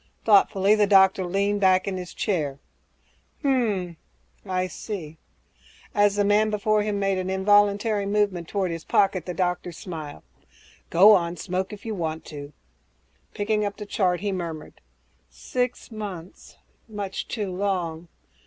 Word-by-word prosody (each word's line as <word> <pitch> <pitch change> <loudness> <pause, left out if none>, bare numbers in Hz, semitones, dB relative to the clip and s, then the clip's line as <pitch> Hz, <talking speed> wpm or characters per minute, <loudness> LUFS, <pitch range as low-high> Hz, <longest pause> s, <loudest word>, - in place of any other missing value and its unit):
Thoughtfully, 200 -1 +4
the 210 -1 +3
doctor 190 -1 +5
leaned 200 +2 0
back 185 -1 +4
in 195 - -2
his 180 -1 -7
chair, 150 -9 -1 0.9
"Hm 280 - +3
m 200 -10 0 0.5
m... 190 - -9
I 185 0 +1
see." 175 -4 -7 0.7
As 205 -1 +3
the 205 -1 +2
man 210 +1 +3
before 215 0 +1
him 210 -1 -1
made 195 -1 0
an 185 0 -3
involuntary 205 +2 +2
movement 200 -5 0
toward 190 -2 -1
his 165 -1 -5
pocket, 190 -4 +1
the 180 - -4
doctor 180 -1 -1
smiled, 160 -4 -8 0.7
"Go 195 +5 +7
on, 175 -2 +1
smoke 185 +1 -3
if 210 0 -10
you 225 - -3
want 160 -4 -4
to." 145 -1 -8 0.8
Picking 210 +1 0
up 205 -1 -3
the 210 - -7
chart, 180 -3 0
he 205 -1 -1
murmured, 170 -4 -6 0.5
"Six 250 -1 -3
months... 195 -5 -8 0.3
much 205 -3 -5
too 210 -5 -3
long. 175 -4 -2
195 Hz, 150 wpm, -25 LUFS, 180-205 Hz, 0.9 s, Go